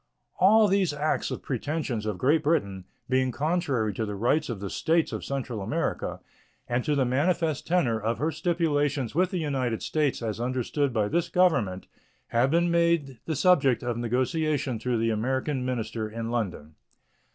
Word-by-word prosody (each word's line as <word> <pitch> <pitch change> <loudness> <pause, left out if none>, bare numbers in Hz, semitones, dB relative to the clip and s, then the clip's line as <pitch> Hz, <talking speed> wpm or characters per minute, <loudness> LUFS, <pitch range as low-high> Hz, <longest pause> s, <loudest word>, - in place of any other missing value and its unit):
All 215 +3 +6
these 195 -5 +2
acts 150 +1 -1
or - - -2
pretensions 130 -4 -3
of 105 -3 -2
Great 150 - +3
Britain, 100 - 0 0.2
being 130 0 +2
contrary 145 - 0
to 110 - -2
the 105 -2 -4
rights 130 +9 +1
of 115 -5 -4
the 100 -1 -5
States 165 0 +1
of - - -4
Central 130 -5 -4
America 95 - -2 0.5
and 120 +1 0
to 150 - 0
the 135 -2 +2
manifest 155 +3 0
tenor 140 -11 +2
of 115 +2 -1
her 155 +2 0
stipulations 150 -5 0
with 180 +4 +2
the 185 - -3
United 130 -8 -1
States 150 -6 0
as 110 -1 -3
understood 130 +3 -1
by 110 -3 +1
this 170 +9 0
Government, 135 - +2 0.4
have 120 +3 +2
been 170 +3 +2
made 170 -7 +1
the 160 - -2
subject 140 -6 +3
of 120 -1 -1
negotiation 130 +2 -1
through 120 +1 -1
the 115 0 +1
American 130 +5 -1
minister 115 -3 -3
in 115 +1 -5
London. 95 -10 -3
130 Hz, 170 wpm, -27 LUFS, 115-160 Hz, 0.5 s, All